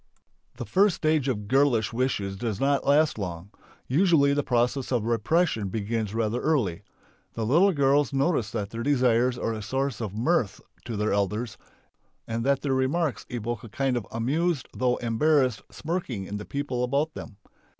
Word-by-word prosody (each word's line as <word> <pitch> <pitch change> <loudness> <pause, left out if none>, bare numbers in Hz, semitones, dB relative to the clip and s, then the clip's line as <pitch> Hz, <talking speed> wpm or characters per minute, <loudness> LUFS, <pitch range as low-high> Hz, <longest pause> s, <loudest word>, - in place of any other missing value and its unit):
The - - -5
first 195 0 +3
stage 155 -3 +1
of 105 -6 -2
girlish 125 -4 +2
wishes 115 -6 -1
does 105 -1 -3
not 140 0 +1
last 145 -3 +3
long. 90 0 -5 0.4
Usually 145 -1 +4
the 145 - +1
process 125 0 0
of 120 -4 0
repression 115 - +1
begins 110 +1 -2
rather 115 +1 0
early. 125 - 0 0.5
The 115 - -3
little 170 - +4
girls 140 -2 +2
notice 135 -5 +1
that 105 -2 -4
their 115 - -5
desires 125 -2 +2
are 115 - -2
a 110 - -5
source 135 +2 -2
of 105 -3 -4
mirth 120 - +1 0.3
to 115 -3 -4
their 105 +1 0
elders, 105 +3 -1 0.7
and 115 0 -2
that 140 +1 +2
their 140 -2 0
remarks 135 +3 0
evoke 120 -1 -4
a 115 - -9
kind 135 +3 0
of 115 -6 -3
amused 145 +6 0
though 125 -1 +1
embarrassed 125 0 +1
smirking 155 - -4
in 100 +2 -5
the 105 - -7
people 140 -3 -3
about 140 +5 0
them. 100 - -9
125 Hz, 170 wpm, -26 LUFS, 110-140 Hz, 0.7 s, Usually